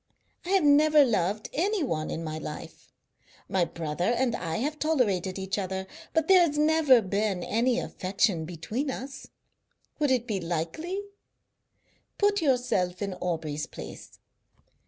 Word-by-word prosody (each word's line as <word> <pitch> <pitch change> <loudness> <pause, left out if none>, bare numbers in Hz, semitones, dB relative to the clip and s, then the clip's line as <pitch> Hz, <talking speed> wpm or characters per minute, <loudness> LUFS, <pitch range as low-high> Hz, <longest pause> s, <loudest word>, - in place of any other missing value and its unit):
I 350 - -7
have 385 -3 +3
never 295 0 +6
loved 210 -2 0
any 390 +3 +1
one 155 - -2
in 165 - -4
my 155 -1 -4
life. 160 +2 -9 0.6
My 185 -2 +1
brother 165 +1 -3
and 245 -2 +1
I 165 0 -3
have 295 +6 -2
tolerated 205 - +1
each 190 +1 -2
other, 190 0 -3 0.3
but 320 -1 +1
there 375 -2 +7
has 300 -4 +2
never 300 -6 +5
been 200 -1 -1
any 240 +4 +1
affection 190 -6 0
between 180 - -4
us. 270 +1 -6 0.7
Would 295 -2 +2
it 250 -2 +2
be 210 -5 -2
likely? 175 - -3 1.2
Put 410 -1 +2
yourself 240 - +1
in 200 -1 -3
Aubrey's 160 -4 -3
place. - - -10
215 Hz, 140 wpm, -27 LUFS, 180-295 Hz, 1.2 s, there